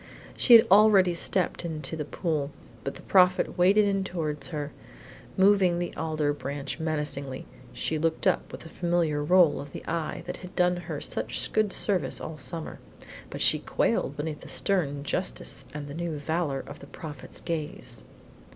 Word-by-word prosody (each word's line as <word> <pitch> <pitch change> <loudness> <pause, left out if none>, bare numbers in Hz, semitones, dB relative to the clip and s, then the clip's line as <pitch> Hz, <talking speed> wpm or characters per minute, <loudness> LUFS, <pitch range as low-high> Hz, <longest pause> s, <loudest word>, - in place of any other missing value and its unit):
She 240 - +7
had 225 - +8
already 200 -3 +6
stepped 175 +1 -1
into 160 -1 -3
the 150 -2 -4
pool, 150 -3 -2 0.3
but 135 - -4
the - - -12
Prophet 185 -2 +4
waded 195 +4 +5
in 195 -1 +1
towards 155 -5 -3
her, 150 -2 -4 0.7
moving 190 -2 +4
the 175 0 -3
alder 155 -2 0
branch 140 +1 -5
menacingly. 150 -4 -3 0.3
She 155 - -2
looked 160 +1 -1
up - - +1
with - - -8
the 165 - -11
familiar 170 -4 0
roll 175 0 +4
of 140 -1 -10
the - - -8
eye 165 -1 -3
that - - -5
had 180 0 -11
done 180 -1 +3
her 175 - -5
such - - -2
good 215 -2 +2
service 190 -3 0
all 155 -1 -7
summer, 160 +4 -6 0.5
but - - -6
she - - +5
quailed - - 0
beneath 150 0 -4
the - - -11
stern 145 -8 0
justice - - -3
and 150 -1 -6
the 140 - -7
new 165 -1 -3
valor 145 -2 -1
of - - -10
the 140 - -12
Prophet's 150 -3 -9
gaze. 165 +3 -4
160 Hz, 170 wpm, -27 LUFS, 150-180 Hz, 0.7 s, had